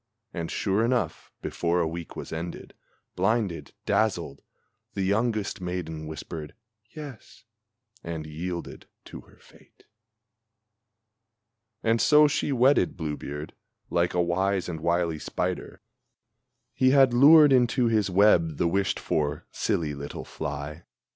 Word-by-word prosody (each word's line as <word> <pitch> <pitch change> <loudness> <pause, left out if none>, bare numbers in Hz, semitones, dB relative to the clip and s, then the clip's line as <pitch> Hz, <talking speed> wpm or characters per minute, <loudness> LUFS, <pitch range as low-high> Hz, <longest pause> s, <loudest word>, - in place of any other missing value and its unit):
And, 85 -2 -4
sure 100 +2 0
enough, 120 0 -1
before 85 +1 0
a 85 - +1
week 85 +1 -7
was - - -7
ended, 85 +2 -6 0.4
blinded, 95 -6 -1
dazzled, 70 - 0 0.5
The 100 - -1
youngest 105 0 0
maiden 85 -3 -4
whispered 80 0 -7 0.4
"yes," 145 -9 -10 0.6
and 80 -2 -5
yielded 85 +3 -6 0.2
to - - -10
her - - -22
fate. - - -22 2.0
And 115 0 +2
so 150 0 +6
she 145 - -1
wedded 130 -7 +3
Blue 80 -3 -3
beard 75 +1 -7 0.4
like 85 +1 +1
a 90 - +3
wise 95 +2 0
and 85 -3 -5
wily 85 -1 0
spider - - -4 0.9
He 130 - +3
had 135 -2 +5
lured 145 +3 +8
into 125 0 +3
his 110 -4 +2
web 90 -5 +4
the - - +2
wished 95 +3 0
for, 75 -1 -1
silly 75 -3 -1
little 70 0 -7
fly! 75 +3 -6
90 Hz, 125 wpm, -26 LUFS, 80-115 Hz, 2.0 s, lured